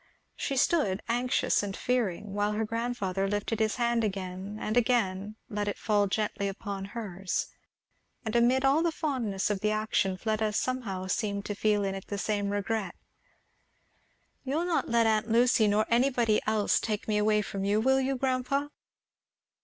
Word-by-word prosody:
She 275 Hz, -, -2 dB
stood, 250 Hz, -, +2 dB
anxious 245 Hz, +2 st, +1 dB
and 200 Hz, -1 st, -4 dB
fearing, 210 Hz, -5 st, -1 dB
while 205 Hz, +1 st, 0 dB
her 220 Hz, +1 st, 0 dB
grandfather 215 Hz, -4 st, -2 dB
lifting 205 Hz, +2 st, -2 dB
his 220 Hz, -1 st, +1 dB
hand 235 Hz, -1 st, +1 dB
again 190 Hz, 0 st, -4 dB
and 215 Hz, -, -2 dB
again 215 Hz, -4 st, +1 dB
let 205 Hz, -1 st, -3 dB
it 205 Hz, -, -2 dB
fall 205 Hz, -2 st, +2 dB
gently 210 Hz, 0 st, -1 dB
upon 195 Hz, 0 st, -5 dB
hers; 195 Hz, -4 st, -3 dB, 0.8 s
and 220 Hz, +1 st, -2 dB
amid 250 Hz, +3 st, +4 dB
all 280 Hz, +4 st, +4 dB
the 335 Hz, 0 st, +1 dB
fondness 240 Hz, -, -1 dB
of 200 Hz, -, -1 dB
the 210 Hz, -, +1 dB
action 215 Hz, -3 st, 0 dB
Fleda 215 Hz, +1 st, -1 dB
somehow 215 Hz, -6 st, -2 dB
seemed 200 Hz, +1 st, -2 dB
to 205 Hz, -, -2 dB
feel 210 Hz, 0 st, +1 dB
in 195 Hz, -1 st, -1 dB
it 195 Hz, -1 st, -7 dB
the 205 Hz, -, -3 dB
same 205 Hz, 0 st, -1 dB
regret. 205 Hz, -1 st, -2 dB, 1.5 s
"You'll 290 Hz, +6 st, -1 dB
not 350 Hz, -2 st, 0 dB
let 235 Hz, -1 st, +3 dB
aunt 220 Hz, 0 st, +2 dB
Lucy, 235 Hz, -1 st, +4 dB
nor 210 Hz, +1 st, +3 dB
anybody 235 Hz, -3 st, +2 dB
else, 215 Hz, -1 st, +2 dB
take 210 Hz, -2 st, -3 dB
me 210 Hz, -1 st, +1 dB
away 210 Hz, 0 st, +3 dB
from 195 Hz, -1 st, -4 dB
you, 205 Hz, +2 st, +2 dB
will 265 Hz, +3 st, +3 dB
you, 270 Hz, +1 st, 0 dB
grandpa?" 265 Hz, +2 st, 0 dB
215 Hz, 165 wpm, -29 LUFS, 200-240 Hz, 1.5 s, amid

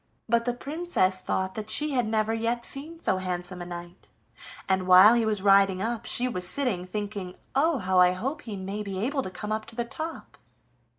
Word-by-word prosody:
But 235 Hz, 0 st, +2 dB
the 245 Hz, -1 st, -1 dB
Princess 275 Hz, -, -1 dB
thought 190 Hz, 0 st, -2 dB
that 215 Hz, +1 st, -6 dB
she 300 Hz, +7 st, +3 dB
had 245 Hz, -4 st, +1 dB
never 220 Hz, 0 st, 0 dB
yet 230 Hz, +1 st, -1 dB
seen 315 Hz, +4 st, -6 dB
so 190 Hz, -, 0 dB
handsome 180 Hz, -1 st, -4 dB
a 175 Hz, -, -6 dB
knight, 175 Hz, 0 st, -9 dB, 0.6 s
and 190 Hz, -1 st, 0 dB
while 185 Hz, +4 st, +9 dB
he 235 Hz, -2 st, +2 dB
was 210 Hz, -3 st, -1 dB
riding 195 Hz, -1 st, +5 dB
up 230 Hz, +3 st, -3 dB
she 250 Hz, -, +2 dB
was 180 Hz, -7 st, -2 dB
sitting 205 Hz, -8 st, 0 dB
thinking, 200 Hz, -2 st, -5 dB, 0.2 s
"Oh! 300 Hz, +3 st, +2 dB
how 185 Hz, -4 st, +1 dB
I 180 Hz, 0 st, +6 dB
hope 270 Hz, -, -4 dB
he 220 Hz, -6 st, -7 dB
may 195 Hz, +2 st, -5 dB
be 200 Hz, -2 st, -5 dB
able 270 Hz, +8 st, -1 dB
to 185 Hz, -, -5 dB
come 210 Hz, +3 st, -6 dB
up 215 Hz, 0 st, -2 dB
to 225 Hz, -, -10 dB
the 240 Hz, 0 st, -2 dB
top!" 315 Hz, +6 st, -7 dB
215 Hz, 210 wpm, -27 LUFS, 185-245 Hz, 0.6 s, while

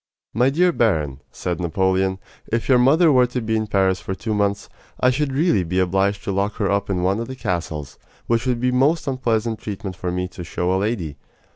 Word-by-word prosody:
"My 125 Hz, +4 st, +3 dB
dear 175 Hz, +6 st, +3 dB
baron," 75 Hz, -, 0 dB
said 90 Hz, -2 st, -3 dB
Napoleon, 95 Hz, +2 st, +1 dB, 0.3 s
"if 115 Hz, 0 st, -1 dB
your 130 Hz, -2 st, +5 dB
mother 155 Hz, +6 st, +5 dB
were 125 Hz, -2 st, +5 dB
to 125 Hz, +1 st, -3 dB
be 110 Hz, -1 st, -1 dB
in 110 Hz, 0 st, -1 dB
Paris 95 Hz, -2 st, +2 dB
for 95 Hz, -, -4 dB
two 110 Hz, +4 st, -3 dB
months, 100 Hz, -1 st, 0 dB, 0.3 s
I 125 Hz, -, +4 dB
should 140 Hz, +2 st, -1 dB
really 135 Hz, -, +2 dB
be 90 Hz, +2 st, -3 dB
obliged 95 Hz, +2 st, +1 dB
to -, -, -2 dB
lock 100 Hz, +2 st, 0 dB
her 100 Hz, -3 st, 0 dB
up 100 Hz, 0 st, 0 dB
in 90 Hz, -2 st, -1 dB
one 95 Hz, +3 st, +1 dB
of 115 Hz, -, -4 dB
the 130 Hz, -, -6 dB
castles, 80 Hz, -, -4 dB, 0.3 s
which 115 Hz, +2 st, 0 dB
would 125 Hz, -2 st, +1 dB
be 125 Hz, +1 st, +1 dB
most 140 Hz, +7 st, +2 dB
unpleasant 115 Hz, -4 st, 0 dB
treatment 100 Hz, -3 st, -6 dB
for 90 Hz, +1 st, -3 dB
me 90 Hz, +1 st, -2 dB
to 90 Hz, -, -8 dB
show 90 Hz, +2 st, -1 dB
a -, -, +2 dB
lady. 95 Hz, -9 st, -2 dB
105 Hz, 220 wpm, -21 LUFS, 95-125 Hz, 0.3 s, your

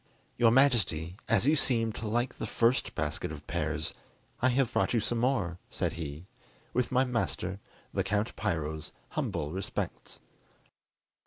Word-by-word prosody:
"Your 115 Hz, -1 st, +5 dB
Majesty, 110 Hz, -, +3 dB
as 115 Hz, 0 st, +4 dB
you 150 Hz, +3 st, +5 dB
seemed 115 Hz, -6 st, +2 dB
to 110 Hz, -, -5 dB
like 120 Hz, +3 st, 0 dB
the 110 Hz, -, -2 dB
first 115 Hz, +5 st, +2 dB
basket 80 Hz, -2 st, -2 dB
of -, -, -8 dB
pears, 80 Hz, +1 st, -1 dB, 0.5 s
I 130 Hz, -, +5 dB
have 125 Hz, -1 st, +2 dB
brought -, -, +2 dB
you -, -, +4 dB
some 115 Hz, +2 st, 0 dB
more," 105 Hz, -9 st, +1 dB
said -, -, -1 dB
he, 80 Hz, 0 st, -6 dB, 0.5 s
"with 125 Hz, -1 st, +1 dB
my 130 Hz, 0 st, +4 dB
master, 105 Hz, -7 st, -1 dB, 0.3 s
the -, -, +1 dB
Count 105 Hz, +3 st, 0 dB
Piro's 80 Hz, -6 st, -2 dB, 0.2 s
humble 75 Hz, 0 st, -2 dB
respects." 95 Hz, +2 st, -4 dB
110 Hz, 150 wpm, -30 LUFS, 85-120 Hz, 0.5 s, Your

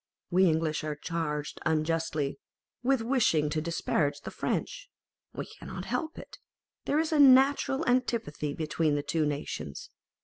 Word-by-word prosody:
We 185 Hz, +2 st, +5 dB
English 160 Hz, -1 st, 0 dB
are 155 Hz, -1 st, -3 dB
charged 150 Hz, -2 st, -3 dB
unjustly 160 Hz, -3 st, 0 dB, 0.4 s
with 255 Hz, -1 st, +2 dB
wishing 215 Hz, -, +2 dB
to 155 Hz, 0 st, 0 dB
disparage 150 Hz, -3 st, -1 dB
the -, -, -7 dB
French: -, -, -3 dB, 0.4 s
we -, -, -5 dB
cannot -, -, -8 dB
help 315 Hz, 0 st, -3 dB
it; -, -, -11 dB, 0.5 s
there 290 Hz, -, +1 dB
is 320 Hz, +1 st, +1 dB
a 310 Hz, -, +2 dB
natural 275 Hz, +2 st, +5 dB
antipathy 230 Hz, -, 0 dB
between 155 Hz, -1 st, 0 dB
the 145 Hz, -, -1 dB
two 155 Hz, 0 st, 0 dB
nations. 110 Hz, -, -5 dB
165 Hz, 140 wpm, -29 LUFS, -, 0.5 s, We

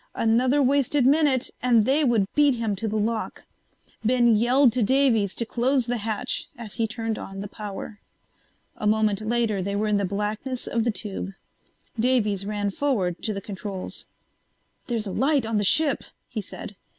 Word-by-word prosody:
Another 250 Hz, +5 st, +3 dB
wasted 275 Hz, 0 st, +2 dB
minute 280 Hz, -2 st, +3 dB
and 235 Hz, -4 st, +4 dB
they 280 Hz, +5 st, +3 dB
would 235 Hz, -7 st, +3 dB
beat 290 Hz, -3 st, +4 dB
him 225 Hz, -3 st, -1 dB
to 220 Hz, +4 st, -3 dB
the 215 Hz, -, -2 dB
lock. 220 Hz, +1 st, -2 dB, 0.6 s
Ben 240 Hz, 0 st, +4 dB
yelled 245 Hz, +3 st, +4 dB
to 250 Hz, -, +1 dB
Davies 230 Hz, -4 st, +2 dB
to 235 Hz, -, -2 dB
close 250 Hz, +2 st, +1 dB
the 245 Hz, +1 st, -1 dB
hatch 220 Hz, +3 st, -2 dB
as 225 Hz, -5 st, -8 dB
he 225 Hz, +4 st, 0 dB
turned 225 Hz, -1 st, -3 dB
on 195 Hz, 0 st, -7 dB
the 205 Hz, -, -5 dB
power. 205 Hz, +1 st, -7 dB, 0.8 s
A 210 Hz, -, -2 dB
moment 215 Hz, -1 st, +2 dB
later 220 Hz, -2 st, 0 dB
they 200 Hz, +2 st, -2 dB
were 210 Hz, +1 st, 0 dB
in 210 Hz, -1 st, +2 dB
the 200 Hz, -, 0 dB
blackness 210 Hz, +6 st, -3 dB
of 230 Hz, -1 st, -1 dB
the 235 Hz, -, +2 dB
tube. 200 Hz, -2 st, -4 dB, 0.7 s
Davies 215 Hz, -5 st, +1 dB
ran 205 Hz, -1 st, -1 dB
forward 195 Hz, -9 st, -1 dB
to 220 Hz, -, -1 dB
the 200 Hz, -1 st, -4 dB
controls. 195 Hz, -1 st, -5 dB, 0.8 s
"There's 230 Hz, -3 st, -2 dB
a 195 Hz, -, -4 dB
light 270 Hz, +3 st, +1 dB
on 225 Hz, -1 st, -1 dB
the 205 Hz, -, +1 dB
ship," 290 Hz, +8 st, +3 dB, 0.2 s
he 225 Hz, -3 st, -4 dB
said. 200 Hz, +1 st, -9 dB
225 Hz, 175 wpm, -25 LUFS, 205-250 Hz, 0.8 s, and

